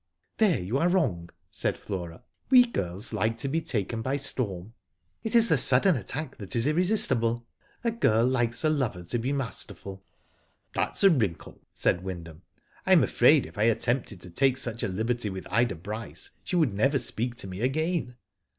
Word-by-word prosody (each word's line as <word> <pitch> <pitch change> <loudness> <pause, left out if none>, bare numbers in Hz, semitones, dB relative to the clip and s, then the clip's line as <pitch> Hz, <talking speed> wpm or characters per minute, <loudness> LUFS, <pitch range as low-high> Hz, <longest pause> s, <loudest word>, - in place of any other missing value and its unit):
" - - -49
There 205 - +3
you 100 +9 -2
are 170 - +2
wrong," 105 - 0 0.2
said - - -2
Flora. 85 -5 -7
'* - - -45
We 250 -2 +7
girls 100 - -4
like 110 +1 0
to 135 - -3
be 160 +4 -1
taken 115 - -3
by 130 +4 -1
storm. 110 -7 -3 0.5
It 225 +1 -3
is 230 -1 +7
the 160 - +3
sudden 135 +9 +6
attack 135 +7 -5
that 100 +4 -5
is 115 +1 +1
irresistible. 145 - +3 0.4
A 235 - +1
girl 115 - +2
likes 120 -1 0
a 155 - +3
lover 120 -12 -2
to 120 +7 -3
be 125 +4 -2
masterful." 100 -7 -5 0.4
*' - - -43
That's - - -1
a 195 - +7
wrinkle," 105 - -2
said 90 - 0
Wyndham. 85 -3 -8 0.4
"I - - +3
am - - +6
afraid - - +4
if 85 +6 -11
I 105 - +3
attempted 115 -3 0
to 90 - -10
take 135 +7 +2
such 120 -3 -3
a - - 0
liberty 110 +3 -2
with 95 -1 -7
Ida 115 -1 +1
Bryce 105 +7 -6
she - - -4
would 155 - +2
never 135 +8 +2
speak 120 -1 -4
to 95 - -5
me 95 +2 -7
again." 155 +1 -1
120 Hz, 190 wpm, -27 LUFS, 100-145 Hz, 0.5 s, We